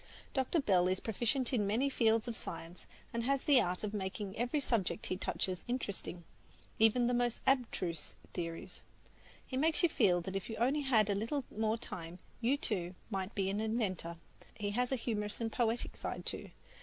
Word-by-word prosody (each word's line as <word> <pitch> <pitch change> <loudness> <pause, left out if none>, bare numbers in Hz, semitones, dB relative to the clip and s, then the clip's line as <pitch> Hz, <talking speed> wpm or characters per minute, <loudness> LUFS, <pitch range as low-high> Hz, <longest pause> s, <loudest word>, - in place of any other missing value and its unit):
Dr. 265 +5 +2
Bell 185 -9 +4
is 185 0 +1
proficient 235 +4 0
in 210 -5 +2
many 230 +7 +2
fields 225 -3 +3
of 235 - -2
science, 170 -3 -7 0.3
and 235 - 0
has 270 +3 +1
the 275 -4 +6
art 180 +2 -1
of 210 0 -2
making 195 0 -3
every 245 +6 +1
subject 230 -9 0
he - - -1
touches 185 -1 -2
interesting, 200 -7 -3 0.6
even 225 +2 +5
the 245 - +2
most 240 -1 +1
abstruse 225 - 0 0.2
theories. 165 -2 -5 0.6
He 260 - -3
makes 315 +5 +3
you 345 - +6
feel 180 - +4
that 190 +3 -5
if 195 - -3
you 225 - -3
only 265 +7 +2
had 235 -7 +4
a - - +3
little 230 +8 -1
more 220 +1 +1
time, 170 -6 -7 0.2
you, 245 +4 +3
too, 185 - -2 0.2
might 195 +1 -2
be 195 -2 +1
an 205 - -1
inventor. 200 -7 -1 0.4
He 205 -1 -2
has 245 +4 +1
a - - +3
humorous 210 -4 -2
and 225 -1 -1
poetic 235 0 0
side, - - -4
too. - - -4
220 Hz, 185 wpm, -35 LUFS, 190-245 Hz, 0.6 s, the